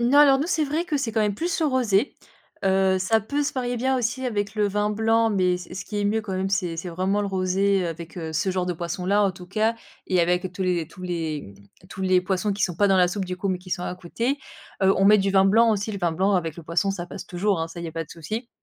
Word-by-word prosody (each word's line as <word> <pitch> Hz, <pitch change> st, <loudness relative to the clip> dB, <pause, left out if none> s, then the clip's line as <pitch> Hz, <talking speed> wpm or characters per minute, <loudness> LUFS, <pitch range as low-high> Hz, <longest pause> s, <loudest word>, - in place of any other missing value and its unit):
Non, 245 Hz, +4 st, +4 dB
alors 280 Hz, -2 st, +7 dB
nous, 295 Hz, -, -1 dB
c'est 315 Hz, -4 st, +1 dB
vrai 305 Hz, +4 st, -1 dB
que 320 Hz, -5 st, -1 dB
c'est 250 Hz, -5 st, -2 dB
quand 220 Hz, -, +1 dB
même 210 Hz, -1 st, +1 dB
plus 340 Hz, -, -2 dB
le 315 Hz, -, +3 dB
rosé, 250 Hz, -4 st, +1 dB, 0.5 s
heu, 190 Hz, 0 st, +3 dB
ça 220 Hz, +4 st, +2 dB
peut 285 Hz, +8 st, -2 dB
se 295 Hz, -, -1 dB
marier 245 Hz, -2 st, -2 dB
bien 260 Hz, +2 st, +1 dB
aussi 250 Hz, +2 st, -1 dB
avec 205 Hz, -3 st, -2 dB
le 210 Hz, -1 st, +2 dB
vin 210 Hz, +1 st, 0 dB
blanc, 225 Hz, +1 st, +2 dB
mais 185 Hz, -3 st, +2 dB
ce 180 Hz, -, -10 dB
ce 190 Hz, -, -5 dB
qui 210 Hz, -, -4 dB
est -, -, -1 dB
mieux 215 Hz, +2 st, +1 dB
quand 205 Hz, -3 st, -6 dB
même, 190 Hz, +1 st, -1 dB
c'est 185 Hz, -4 st, -1 dB
c'est 170 Hz, +2 st, -5 dB
vraiment 185 Hz, +4 st, 0 dB
le 205 Hz, -, -1 dB
rosé, 190 Hz, +1 st, +1 dB
heu, -, -, -1 dB
avec 165 Hz, 0 st, -7 dB
ce 165 Hz, +1 st, -2 dB
genre 185 Hz, -1 st, -1 dB
de 180 Hz, -, 0 dB
poisson-là, 180 Hz, +4 st, 0 dB
en 200 Hz, -, +3 dB
tout 180 Hz, 0 st, -12 dB
cas 220 Hz, +4 st, +1 dB, 0.3 s
et 185 Hz, -1 st, +2 dB
avec 180 Hz, +1 st, 0 dB
tous 190 Hz, -, -4 dB
les 175 Hz, -4 st, 0 dB
tous 185 Hz, -, -13 dB
les, 165 Hz, -4 st, -3 dB, 0.4 s
mmh, -, -, -17 dB
tous 190 Hz, 0 st, -7 dB
les 185 Hz, -1 st, +4 dB
poissons 190 Hz, +2 st, -1 dB
qui 195 Hz, 0 st, -3 dB
sont 180 Hz, -3 st, +1 dB
pas 200 Hz, +4 st, +3 dB
dans 195 Hz, -, +4 dB
la 180 Hz, -1 st, +5 dB
soupe, 195 Hz, +2 st, -2 dB
du 180 Hz, 0 st, -5 dB
coup, 195 Hz, +2 st, -2 dB
mais 185 Hz, -, 0 dB
qui 185 Hz, 0 st, -14 dB
sont 175 Hz, -, -1 dB
à 180 Hz, -, -3 dB
côté. 230 Hz, +10 st, -2 dB, 0.4 s
Heu, 190 Hz, 0 st, +5 dB
on 195 Hz, -, +2 dB
met 210 Hz, +1 st, +7 dB
du 195 Hz, 0 st, +1 dB
vin 190 Hz, 0 st, +5 dB
blanc 225 Hz, +4 st, +5 dB
aussi, 210 Hz, +1 st, -1 dB
le 200 Hz, -, -4 dB
vin 170 Hz, -3 st, 0 dB
blanc 190 Hz, +5 st, +1 dB
avec 165 Hz, -4 st, 0 dB
le 170 Hz, -, -9 dB
poisson 170 Hz, +5 st, 0 dB
ça 175 Hz, -3 st, -4 dB
passe -, -, -8 dB
toujours, 185 Hz, 0 st, 0 dB
hein, 165 Hz, -, -2 dB
ça, 165 Hz, -, -10 dB
il 170 Hz, -, -6 dB
y -, -, -3 dB
a -, -, -9 dB
pas 165 Hz, 0 st, -3 dB
de 150 Hz, -, -22 dB
souci. 215 Hz, +9 st, -5 dB
195 Hz, 295 wpm, -24 LUFS, 180-220 Hz, 0.5 s, alors